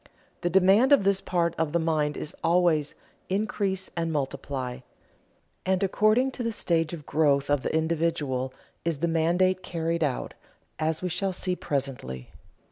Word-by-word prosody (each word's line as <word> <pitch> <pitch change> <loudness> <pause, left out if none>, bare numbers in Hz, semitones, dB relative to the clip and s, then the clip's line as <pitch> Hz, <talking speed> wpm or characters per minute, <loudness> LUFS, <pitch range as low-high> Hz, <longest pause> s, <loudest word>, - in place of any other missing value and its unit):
The 175 - 0
demand 195 - +5
of 280 -8 +6
this 195 0 +2
part 170 -2 0
of 160 -2 0
the 170 - +3
mind 155 -2 0
is 150 - -6
always 165 -3 +2 0.3
"increase 195 -1 -1
and 165 -1 -1
multiply," 135 -3 -3 0.8
and 190 0 +1
according 215 +7 +3
to 255 - -5
the 230 - 0
stage 165 -6 0
of 160 -5 -7
growth 145 -2 +2
of 145 -2 +2
the - - -2
individual 160 -5 0 0.3
is 165 -3 0
the 170 - +2
mandate 175 +3 +2
carried 165 -1 -1
out, 140 -4 -2 0.5
as 160 +2 0
we 180 - 0
shall 185 +3 -1
see 180 0 -1
presently. 130 - -4
165 Hz, 155 wpm, -27 LUFS, 150-185 Hz, 0.8 s, of